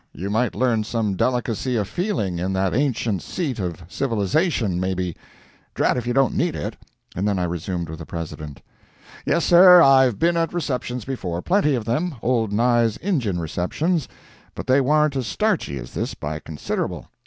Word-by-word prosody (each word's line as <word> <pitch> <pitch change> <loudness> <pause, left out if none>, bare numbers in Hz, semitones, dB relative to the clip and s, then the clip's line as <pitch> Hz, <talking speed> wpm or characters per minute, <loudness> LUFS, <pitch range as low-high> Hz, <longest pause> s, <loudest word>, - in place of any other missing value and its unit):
You 95 +4 -4
might 115 +3 0
learn 120 -4 +1
some 110 -3 -1
delicacy 125 +2 -1
of 105 -4 0
feeling 110 - -2
in 95 +2 -1
that 95 -1 0
ancient 120 -6 0
seat 145 -11 -3
of 90 -3 -4
civilization, 115 - 0
maybe. 95 -2 -2 0.6
Drat - - +2
if 125 -1 -3
you 120 - 0
don't 135 -2 +3
need - - 0
it." - - -4 0.4
And 95 +4 -1
then 100 -2 +1
I 90 - 0
resumed 85 0 -3
with 80 0 -8
the 85 - -7
President: 75 -3 -7 0.6
"Yes, 170 - +2
sir, 180 +1 +8
I've 130 -7 +5
been 170 +1 +2
at 165 +1 -1
receptions 125 -7 -3
before, 90 -10 -4
plenty 175 -7 +2
of 115 -4 -3
them—old 120 - -1
Nye's 115 0 +2
Injun 135 - -1
receptions. 130 - -1 0.5
But - - -6
they 130 +2 +4
warn't 150 +1 +2
as 130 -4 -2
starchy 195 - 0
as - - -9
this - - -3
by 75 +1 -5
considerable. 75 -1 -4
115 Hz, 170 wpm, -22 LUFS, 95-140 Hz, 0.6 s, sir